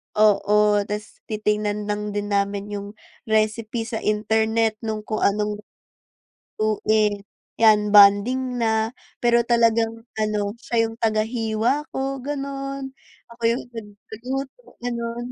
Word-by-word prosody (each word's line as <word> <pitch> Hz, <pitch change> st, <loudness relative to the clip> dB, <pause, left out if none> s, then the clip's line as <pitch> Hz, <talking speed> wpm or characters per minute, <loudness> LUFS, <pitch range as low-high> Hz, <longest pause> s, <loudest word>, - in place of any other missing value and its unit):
Oo, 210 Hz, 0 st, +4 dB
tas 210 Hz, +1 st, -6 dB
titingnan 210 Hz, -1 st, -1 dB
lang 210 Hz, 0 st, -2 dB
din 205 Hz, 0 st, -3 dB
namin 200 Hz, 0 st, -1 dB
yung 200 Hz, -1 st, -5 dB, 0.4 s
recipe 220 Hz, +1 st, 0 dB
sa 225 Hz, 0 st, -4 dB
internet 220 Hz, +1 st, +1 dB
nung 220 Hz, -2 st, -4 dB
kung 215 Hz, 0 st, -3 dB
anong 210 Hz, +1 st, 0 dB, 1.0 s
lutuin, 215 Hz, -1 st, +1 dB, 0.4 s
yan 210 Hz, -2 st, +5 dB
bonding 240 Hz, +6 st, +5 dB
na. 220 Hz, -1 st, +1 dB, 0.3 s
Pero 235 Hz, -1 st, +3 dB
talagang 230 Hz, -1 st, +2 dB, 0.2 s
ano 210 Hz, -1 st, 0 dB
siya 230 Hz, -1 st, 0 dB
yung 225 Hz, -, -11 dB
tagahiwa 225 Hz, +4 st, 0 dB
ko 270 Hz, 0 st, -2 dB
ganon, 275 Hz, 0 st, -5 dB, 0.4 s
ako 235 Hz, 0 st, -15 dB
yung 235 Hz, +2 st, +1 dB, 0.5 s
nagluluto 265 Hz, -, -5 dB, 0.2 s
ganun. 235 Hz, -1 st, -3 dB
220 Hz, 115 wpm, -23 LUFS, 210-235 Hz, 1.0 s, yan